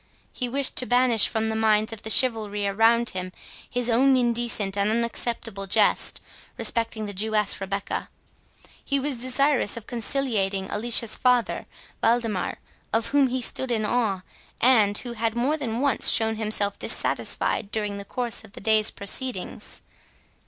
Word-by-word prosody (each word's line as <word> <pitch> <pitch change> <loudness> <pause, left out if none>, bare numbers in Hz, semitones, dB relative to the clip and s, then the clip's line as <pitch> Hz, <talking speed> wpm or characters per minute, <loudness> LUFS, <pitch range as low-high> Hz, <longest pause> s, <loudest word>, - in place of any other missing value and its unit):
He 250 -2 -2
wished 275 +1 +2
to 255 - +5
banish 245 -3 +5
from 220 0 -2
the 220 - -2
minds 220 0 +1
of 220 - -10
the 220 - -6
chivalry 215 -4 +2
around 225 +4 +3
him 185 0 -5 0.4
his 245 -1 -1
own 260 +3 +3
indecent 235 -5 0
and 200 +1 0
unacceptable 230 -3 -2
jest 210 +1 +2 0.4
respecting 230 -2 +1
the 205 - -6
Jewess 210 0 0
Rebecca; 195 +1 -4 0.7
he 280 0 0
was 270 -3 -3
desirous 255 -3 +1
of 225 - -9
conciliating 220 -6 -2
Alicia's 230 +1 +3
father 250 -2 +1 0.3
Waldemar, 225 -5 0 0.3
of 225 +1 0
whom 280 -1 +3
he 255 0 -3
stood 260 +2 0
in 220 -3 0
awe, 210 -6 -1 0.4
and 215 -5 +4
who 240 -2 -5
had 225 0 -2
more 260 +6 0
than 245 -5 -4
once 280 -1 +3
shown 225 0 +2
himself 210 -2 -1
dissatisfied 200 - 0
during 210 -2 -2
the 200 - -7
course 240 +3 -3
of 215 -2 -16
the - - -9
day's 220 -1 +2
proceedings. 205 0 -3
225 Hz, 150 wpm, -24 LUFS, 210-245 Hz, 0.7 s, to